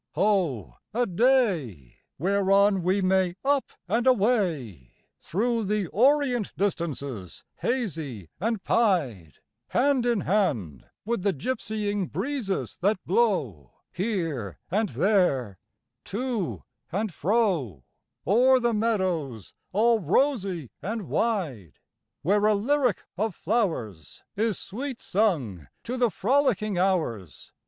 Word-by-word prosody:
Ho, 185 - 0 0.2
a 245 +1 +2
day 180 - +1 0.2
Whereon 195 +3 +3
we 185 +3 +1
may 185 -1 +2
up 280 -1 +2 0.2
and 230 +6 +1
away 180 - +1 0.3
Through 230 +4 -1
the 205 -3 -1
orient 255 -2 +2
distances 140 - -3
hazy 160 - -3
and 220 +1 -1
pied, 135 - +1 0.3
Hand 260 -2 +2
in 235 -5 +2
hand 130 - 0 0.2
with 235 -2 -1
the 200 0 +1
gypsying 205 - -2
breezes 245 -8 -3
that 200 +3 +2
blow 150 - 0 0.2
Here 165 - -3
and 210 +2 +1
there, 140 - +1 0.5
to 230 -3 -3 0.3
and 200 +1 -2
fro, 165 - 0 0.4
O'er 255 +7 +5
the 240 -1 +1
meadows 185 - -1 0.2
all 225 +3 +3
rosy 190 - 0
and 210 +4 -4
wide, 160 - -1 0.5
Where 205 +5 +3
a 215 - +4
lyric 250 +1 +1
of 210 -2 -1
flowers 160 - -2
Is 215 -1 0
sweet 255 +4 -5
sung 140 - 0 0.2
to 245 - -4
the 245 -2 +2
frolicking 215 -4 +1
hours. 155 - -1
195 Hz, 110 wpm, -26 LUFS, 155-230 Hz, 0.5 s, O'er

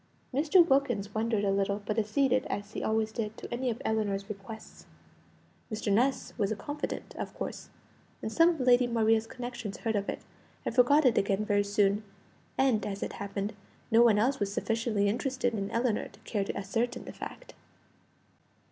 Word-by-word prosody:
Mr. 320 +5 +5
Wilkins 240 - +1
wondered 220 -1 0
a 200 - +2
little; 200 +1 0
but 215 +2 0
acceded, 255 +4 +2
as 205 +1 -4
he - - -3
always 220 0 0
did, 220 -1 -4
to - - -7
any 250 +1 -1
of 230 0 -3
Ellinor's 205 -3 0
requests. 210 +2 -9 0.8
Mr. 215 -1 0
Ness 255 +6 +1
was 205 -1 +1
a - - 0
confidant, 290 +7 -5
of - - -4
course, - - -6 0.5
and 220 - -4
some 330 +7 +5
of 335 -3 -1
Lady 250 0 +5
Maria's 225 -1 +2
connections 240 -4 -6
heard 225 -2 -1
of 200 -1 -1
it, - - -4 0.4
and - - -1
forgot 270 +5 +5
it 245 - +5
again 200 +1 0
very 205 -1 +2
soon; 205 +1 +2 0.5
and, 260 -5 +3
as 200 -1 -3
it - - -4
happened, 200 +1 -4 0.4
no 225 +1 +6
one 230 -3 +6
else 255 +6 +2
was 200 -1 -1
sufficiently 225 -1 0
interested 245 +2 0
in 200 -2 -2
Ellinor 230 -1 0
to 200 - -19
care 210 -2 -1
to - - -4
ascertain 225 +5 -2
the - - -8
fact. - - -9
220 Hz, 180 wpm, -30 LUFS, 205-245 Hz, 0.8 s, no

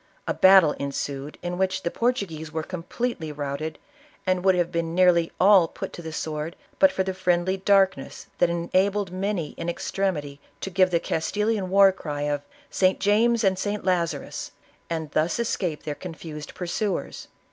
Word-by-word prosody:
A - - +1
battle 190 -5 +7
ensued, 140 +1 -4
in 175 +1 -3
which 190 0 0
the 170 - -1
Portuguese 195 -11 -2
were 160 0 -3
completely 180 0 -4
routed 145 +1 -4 0.5
and 185 -1 +1
would 190 -1 +4
have 175 -1 0
been, 165 0 -2
nearly 175 -2 +4
all 190 -2 +6
put - - -7
to - - -8
the 160 -1 -6
sword 155 +1 -4 0.2
but 285 -1 +6
for 190 - 0
the 190 0 -3
friendly 185 0 +1
darkness 195 0 +1
that 175 - +4
enabled 185 +3 0
many 185 -4 -2
in 170 - -3
extremity 160 -6 -2 0.2
to 195 - -4
give 185 0 +4
the 170 -2 +2
Castilian 205 +4 -1
war 195 0 +6
cry 150 -6 -5
of 145 -1 -1 0.2
" - - -30
St. 185 0 +4
James 225 +3 +3
and 190 -2 +2
St. 205 0 -3
Lazarus,'' 170 -5 -1 0.4
and 160 -3 -3
thus 155 +3 +1
escnpc 185 -9 -2
their 150 - -3
confused 155 -2 -8
pursuers. 190 +3 -3
180 Hz, 170 wpm, -25 LUFS, 160-195 Hz, 0.5 s, battle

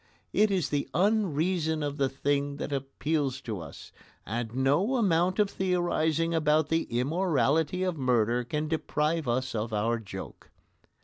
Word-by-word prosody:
It 215 0 +4
is 185 -7 0
the 145 -1 -1
unreason 175 -5 +1
of 145 0 -3
the 135 -2 +1
thing 140 +1 -1
that 145 - -4
appeals 135 0 -1
to 110 -6 -5
us, 80 -4 -10 0.3
and 115 +2 -4
no 145 - +2
amount 185 -5 +2
of 210 -1 +4
theorising 175 -4 0
about 155 -1 +2
the 165 0 +1
immorality 160 +5 +1
of 180 -5 -2
murder 120 -2 +2
can 150 +5 -2
deprive 155 -1 -1
us 130 +2 -1
of 110 0 -2
our 115 +2 0
joke. 95 -3 -9
150 Hz, 145 wpm, -28 LUFS, 130-170 Hz, 0.3 s, It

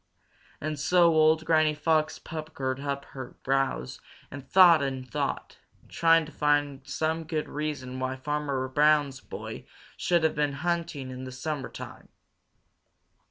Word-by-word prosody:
And 150 -1 -4
so 170 +2 +4
old 160 0 +4
Granny 155 -2 +3
Fox 155 +1 +1
puckered 150 -5 -5
up 140 0 -3
her 130 -2 -8
brows 135 - -1 0.3
and 140 0 -8
thought 175 -4 +7
and 135 -2 -3
thought, 120 - -3 0.3
trying 165 -1 +4
to 150 - -11
find 145 -2 +1
some 160 +3 -1
good 155 -1 -3
reason 145 -4 -4
why 130 0 -2
Farmer 140 -1 -2
Brown's 145 0 +3
boy - - -8 0.3
should 175 -2 +1
have 160 - +3
been 145 -1 0
hunting 165 -3 -2
in 130 0 -7
the 130 - -7
summertime. 135 0 -6
150 Hz, 135 wpm, -27 LUFS, 135-160 Hz, 0.3 s, thought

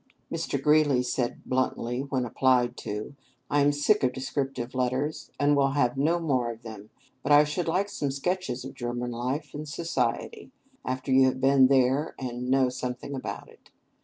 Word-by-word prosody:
Mr. 140 - -2
Greeley 145 -2 +3
said 125 -1 -2
bluntly 125 -1 -1
when 135 -2 -2
applied 125 0 +2
to, 105 +6 -5 0.4
"I 145 - +3
am 145 +1 +4
sick 145 +9 +2
of 125 -1 +2
descriptive 130 -2 -3
letters, 130 +4 -1
and 145 0 +4
will 140 -1 +2
have 125 -4 +2
no 155 +6 +2
more 130 -7 0
of 115 0 -8
them. 110 -2 -9 0.3
But 145 - -2
I 145 +1 +8
should 150 +4 -2
like 185 +5 +1
some 145 -8 -3
sketches 140 -2 -2
of 135 - -7
German 120 -1 -4
life 130 +5 -3
and 150 0 -6
society, 170 - -2 0.3
after 130 +1 -3
you 130 0 +6
have 130 0 -1
been 135 0 +5
there, 135 +3 +2
and 125 -1 -4
know 130 0 +4
something 125 +2 -5
about 130 - -5
it. - - -20
135 Hz, 175 wpm, -27 LUFS, 125-145 Hz, 0.4 s, I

